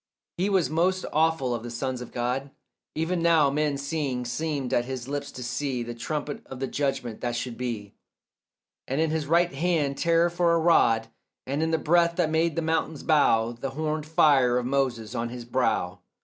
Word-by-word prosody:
He 190 +4 0
was 190 -5 +2
most 180 +4 +1
awful 155 -5 +2
of 120 - -3
the 120 - -7
sons 125 +1 -3
of 125 - -8
God. 125 +3 -2 0.5
Even 165 +2 -1
now 165 -4 +4
men 150 0 0
seeing 140 -3 -2
seemed 135 0 -2
at 120 - +2
his 130 -1 -5
lips 140 0 -4
to 125 - -7
see 125 0 -2
The 120 0 -6
trumpet 145 +4 -4
of 130 - -8
the 135 - -1
judgment 135 -4 -2
that 120 -1 -2
should 120 0 -4
be, 115 -5 -5 0.9
And 135 +3 -1
in 160 -1 +2
his 155 -2 -1
right 170 +1 +3
hand 150 -2 0
terror 170 0 +3
for 170 -1 +2
a - - +2
rod, 115 -9 +3 0.4
And 140 +3 -2
in 160 - +1
the 160 - +2
breath 170 +2 +3
that 170 -3 +1
made 160 0 +1
the 165 - -1
mountains 160 -1 -1
bow 115 -7 +3
The 120 +3 -5
horned 155 +2 -3
fire 135 -6 +4
of 125 - -1
Moses 125 -4 -1
on 120 -1 -2
his 120 0 -7
brow. 115 -7 0
140 Hz, 195 wpm, -26 LUFS, 125-160 Hz, 0.9 s, now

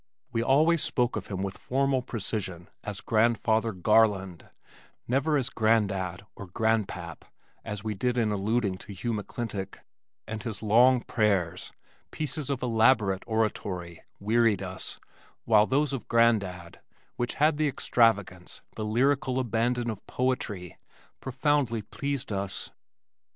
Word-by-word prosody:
We 115 -1 0
always 150 +6 +4
spoke 125 -1 0
of 110 -2 -4
him 95 -1 -3
with 95 -1 -5
formal 135 0 +1
precision 100 -7 -4
as 105 -2 -5
Grandfather 115 0 +2
Garland, 95 -2 +2 0.6
never 140 +5 +2
as 135 -1 -1
"Grandad" 100 -5 +1
or 100 - -9
"Granpap" 95 -5 -1 0.4
as 105 0 -6
we 110 -1 -2
did 125 +5 -1
in 110 -3 +2
alluding 105 -1 0
to 105 - -9
Hugh 115 +5 -2
McClintock, 105 -2 -4 0.5
and 110 0 -5
his 115 -3 -5
long 120 +4 +5
prayers 95 -7 0 0.4
(pieces 155 -1 -3
of 135 -2 -2
elaborate 110 -5 +3
oratory) 95 -6 -2 0.2
wearied 110 -1 +2
us, 95 0 -5 0.5
while 110 -1 +5
those 140 +2 +1
of 135 - -5
Grandad, 100 -7 +1 0.3
which 120 0 -2
had 150 +1 +3
the 155 0 +2
extravagance, 105 -9 +1
the 110 - -4
lyrical 130 +4 +1
abandon 120 0 0
of 105 -2 -9
poetry, 105 -9 -2 0.4
profoundly 130 -4 0
pleased 140 +3 -4
us. 100 -1 -3
110 Hz, 130 wpm, -28 LUFS, 100-125 Hz, 0.6 s, long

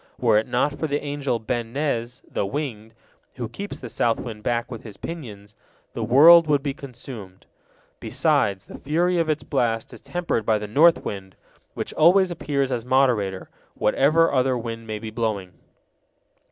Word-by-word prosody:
Were 115 -4 +4
it 110 - -4
not 130 +4 +1
for 160 - -1
the 145 0 -1
angel 145 -4 -2
Ben 115 0 -4
Nez, 125 -4 -2
the - - -2
Winged, 115 -2 -5 0.4
who 120 -3 -4
keeps 200 - -7
the 125 - -7
south 115 0 0
wind 110 -3 -7
back 120 +2 -1
with 115 - -6
his 110 -4 -11
pinions, 105 -11 -8 0.4
the 115 - -3
world 155 +8 +7
would 145 -2 +2
be 140 -2 -2
consumed. 120 -8 -10 0.5
Besides, 95 -2 +1
the - - -11
fury 170 +5 +1
of 165 -1 0
its 155 0 -1
blast 115 -5 -1
is - - -11
tempered 175 -10 -2
by 110 0 +2
the 105 - -5
north 160 +10 +4
wind, 95 -3 -6 0.4
which - - -5
always 180 +4 +5
appears 140 -5 -1
as 120 -2 -2
moderator, 120 -7 +1 0.2
whatever 155 +9 +3
other 130 -1 +2
wind 115 -1 -6
may 110 -1 -3
be 110 +1 -7
blowing. 105 -5 -3
125 Hz, 170 wpm, -23 LUFS, 110-145 Hz, 0.5 s, world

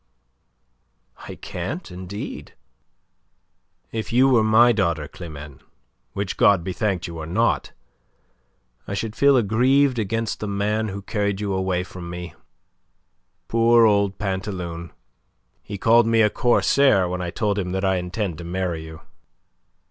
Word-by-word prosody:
"I - - -7
can't, 100 - -6
indeed." 95 +3 -7 1.4
"If 110 -1 -4
you 125 +3 +5
were 120 -4 +4
my 110 +3 +5
daughter, 85 -9 0
Climene, 75 -4 -10 0.5
which 100 -1 -3
God 100 -4 +4
be 95 - -4
thanked 95 -5 -1
you 85 -1 -7
are 80 - -6
not, 115 +8 0 1.2
I 100 - -3
should 110 +2 -4
feel 140 -1 +5
aggrieved 125 +4 +3
against 110 +1 -2
the 105 - -4
man 105 +2 -1
who 100 -1 -6
carried 100 -1 -1
you 100 -2 -2
away 95 -1 -1
from 90 -1 -9
me. 90 0 -7 1.1
Poor 115 0 +4
old 100 -2 +2
Pantaloon! 95 -4 -4 0.7
He 100 - -7
called 115 +3 +4
me 115 0 +3
a 105 - +3
corsair 120 -4 +3
when 90 +1 -3
I 90 - -3
told 105 +2 -1
him 90 -2 -3
that 95 +1 -1
I 95 -1 +2
intend 90 -1 -3
to - - -7
marry 85 -2 -3
you." 80 0 -11
100 Hz, 140 wpm, -23 LUFS, 90-110 Hz, 1.4 s, you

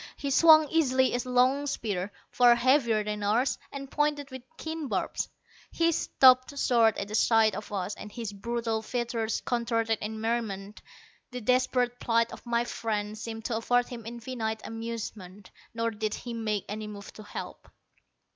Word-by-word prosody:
He 280 - -3
swung 310 +1 +7
easily 260 -5 +2
a 245 +1 -3
long 260 +3 +3
spear, 205 -7 -2 0.2
far 245 -1 +6
heavier 235 -3 +3
than 210 0 -4
ours, 225 +6 +1
and 275 -1 -7
pointed 295 -1 0
with 260 -1 -7 0.2
keen 320 -2 -5
barbs. - - -2 0.4
He 335 0 +2
stopped 260 -2 +4
short 230 -5 +3
at 200 - -3
the 210 - -8
sight 220 -1 +4
of 210 +2 -7
us, 200 0 -2
and 210 - -9
his 225 -2 -5
brutal 230 +1 -2
features 230 -1 -2
contorted 230 -2 0
in 220 +1 -4
merriment. 215 -3 -3 0.5
The 250 0 -6
desperate 250 +1 +1
plight 230 0 +1
of - - -10
my 235 0 +1
friend 215 -3 -3
seemed 225 0 -7
to 230 - -1
afford 245 +2 +1
him 230 -3 -8
infinite 230 -2 -4
amusement. 220 -4 -7 0.2
Nor 230 0 0
did 215 -1 -3
he 240 - -7
make 215 -3 -2
any 215 +1 -5
move 205 -1 -9
to - - -11
help. 205 - -8
230 Hz, 165 wpm, -28 LUFS, 215-255 Hz, 0.5 s, swung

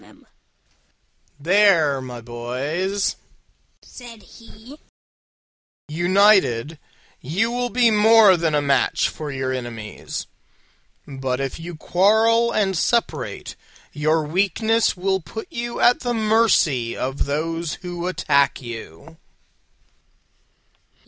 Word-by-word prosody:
"There, 165 -5 +3
my 125 -2 -8
boys," 135 - -3 0.7
said 235 -4 -13
he, 230 +5 -15 1.1
"united 175 - +2 0.4
you 195 - -1
will 245 0 -2
be 240 -2 +3
more 215 -2 +6
than 165 -3 0
a 145 - +1
match 140 -1 +1
for 150 -2 -7
your 130 -1 -3
enemies: 120 -4 -6 0.8
but 135 -2 -4
if 135 +3 -4
you 170 +1 -8
quarrel 220 +8 +2
and 195 -4 0
separate, 235 +7 -2 0.4
your 155 +1 0
weakness 200 +7 0
will 190 +1 0
put 220 +7 -8
you 235 0 -5
at 245 - +4
the 245 -2 -2
mercy 215 - +2
of 135 +2 -3
those 165 +3 -3
who 175 0 -5
attack 140 -6 +1
you." 115 -10 -10
175 Hz, 100 wpm, -21 LUFS, 140-215 Hz, 1.1 s, more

